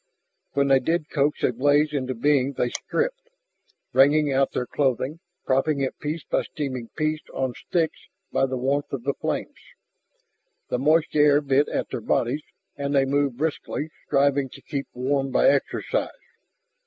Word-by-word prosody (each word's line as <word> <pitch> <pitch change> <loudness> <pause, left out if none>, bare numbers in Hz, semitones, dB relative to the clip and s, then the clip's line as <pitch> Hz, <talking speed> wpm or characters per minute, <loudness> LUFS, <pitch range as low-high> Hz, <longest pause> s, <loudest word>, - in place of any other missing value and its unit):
When 140 0 +2
they 135 -1 +6
did 165 +4 -1
coax 145 0 +1
a - - +3
blaze 145 +4 +3
into 130 -2 -2
being 140 +2 +2
they 125 -1 0
stripped, - - -2 0.6
wringing 145 +2 +4
out 135 0 +2
their 125 - -2
clothing, 135 +3 -1 0.3
propping 135 +3 +1
it 135 - -2
piece 150 +1 -3
by - - 0
steaming 130 -6 -5
piece 155 0 0
on 130 -2 -1
sticks 165 +3 -2 0.2
by 135 - +2
the 130 0 -3
warmth 140 +3 -1
of 130 -4 -3
the 140 +2 0
flames. - - -4 1.1
The 125 - 0
moist 155 +4 +2
air 145 -1 +6
bit 140 0 +2
at - - -2
their - - -4
bodies 125 +6 0 0.3
and 140 0 -2
they 135 -1 +4
moved 140 -2 0
briskly, 155 0 -2 0.2
striving 140 -1 +2
to - - -12
keep 140 -1 -4
warm 135 +2 0
by - - +4
exercise. 145 - 0
140 Hz, 160 wpm, -24 LUFS, 130-150 Hz, 1.1 s, they